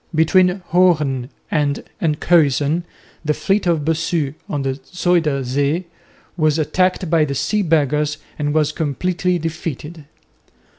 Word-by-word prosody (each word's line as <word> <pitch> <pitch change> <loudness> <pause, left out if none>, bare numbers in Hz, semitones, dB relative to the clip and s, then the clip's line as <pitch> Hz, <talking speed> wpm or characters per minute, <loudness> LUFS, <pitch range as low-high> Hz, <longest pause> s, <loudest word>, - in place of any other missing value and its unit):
Between 180 +3 +3
Hoorn 150 -8 +2 0.2
and 145 -2 0 0.2
Enkhuizen 155 -1 +2 0.4
the 150 -1 0
fleet 195 -1 0
of 160 -4 +1
Bossu 160 -3 0 0.2
on 145 -2 -2
the 135 0 -2
Zuyder 170 -6 +1
Zee 140 +7 0 0.5
was 155 -3 +2
attacked 185 +4 +1
by 160 -1 +3
the 140 -2 -2
Sea 210 +9 0
Beggars 150 -3 +1 0.2
and 145 0 0
was 155 -1 +2
completely 175 +4 -1
defeated. 160 -1 -5
155 Hz, 120 wpm, -19 LUFS, 145-175 Hz, 0.5 s, Between